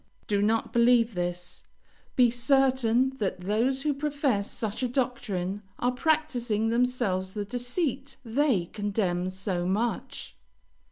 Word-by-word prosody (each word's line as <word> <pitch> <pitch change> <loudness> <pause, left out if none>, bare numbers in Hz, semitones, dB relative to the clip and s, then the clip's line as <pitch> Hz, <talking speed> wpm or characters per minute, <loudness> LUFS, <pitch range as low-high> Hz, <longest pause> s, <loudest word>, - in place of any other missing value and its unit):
Do 205 -2 +1
not 225 +2 +1
believe 235 -1 +4
this; 175 0 -4 0.5
be 245 -2 +5
certain 260 0 +3
that 190 -4 -2
those 235 +8 0
who 300 -1 +1
profess 280 -7 -1
such 220 +1 -4
a 255 - +1
doctrine 205 -7 -2 0.2
are 245 - +1
practising 250 -7 0
themselves 230 -6 0
the 205 -1 -3
deceit 265 - -2
they 235 - +1
condemn 190 -2 -1
so 185 -2 -3
much. 220 +5 -2
235 Hz, 120 wpm, -27 LUFS, 200-260 Hz, 0.5 s, be